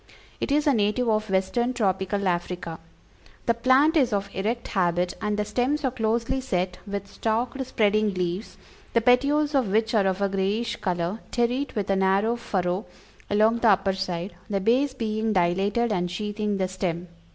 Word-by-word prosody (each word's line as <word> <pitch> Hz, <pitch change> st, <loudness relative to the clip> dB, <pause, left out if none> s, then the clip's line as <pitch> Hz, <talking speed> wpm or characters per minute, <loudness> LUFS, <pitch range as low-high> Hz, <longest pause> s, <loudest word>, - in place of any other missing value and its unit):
It -, -, -2 dB
is 295 Hz, +2 st, +2 dB
a 290 Hz, -, +4 dB
native 215 Hz, +2 st, +1 dB
of 215 Hz, -1 st, 0 dB
Western 235 Hz, +7 st, 0 dB
Tropical 195 Hz, -2 st, 0 dB
Africa. 175 Hz, -1 st, -2 dB, 0.7 s
The 235 Hz, -, +3 dB
plant 260 Hz, +7 st, +4 dB
is 265 Hz, -6 st, +3 dB
of 200 Hz, -1 st, -2 dB
erect 225 Hz, +5 st, -2 dB
habit, 180 Hz, -2 st, +1 dB
and 210 Hz, -1 st, -1 dB
the 210 Hz, -, 0 dB
stems 255 Hz, +8 st, 0 dB
are 260 Hz, -, +1 dB
closely 230 Hz, +2 st, 0 dB
set 185 Hz, -7 st, -2 dB
with 200 Hz, 0 st, -4 dB
stalked 235 Hz, +6 st, -2 dB
spreading 215 Hz, -3 st, +2 dB
leaves, 180 Hz, +3 st, -3 dB, 0.4 s
the 230 Hz, -, +3 dB
petioles 280 Hz, +5 st, +3 dB
of 265 Hz, -5 st, +2 dB
which 220 Hz, +4 st, +1 dB
are 205 Hz, -3 st, +3 dB
of 190 Hz, 0 st, 0 dB
a 200 Hz, -, +2 dB
grayish 200 Hz, +4 st, -1 dB
color, 180 Hz, +2 st, -2 dB
terete 250 Hz, +3 st, -1 dB
with 205 Hz, -3 st, -1 dB
a -, -, +3 dB
narrow 195 Hz, +4 st, +2 dB
furrow 185 Hz, -4 st, -2 dB, 0.4 s
along 215 Hz, +3 st, +3 dB
the 230 Hz, -, +4 dB
upper 195 Hz, -1 st, +3 dB
side, 185 Hz, -1 st, -4 dB, 0.2 s
the 200 Hz, -1 st, 0 dB
base 255 Hz, +7 st, +2 dB
being 220 Hz, -2 st, -1 dB
dilated 195 Hz, +6 st, +1 dB
and 180 Hz, -2 st, -1 dB
sheathing 210 Hz, +2 st, -2 dB
the 190 Hz, -1 st, 0 dB
stem. 180 Hz, -2 st, -3 dB
210 Hz, 175 wpm, -25 LUFS, 190-235 Hz, 0.7 s, a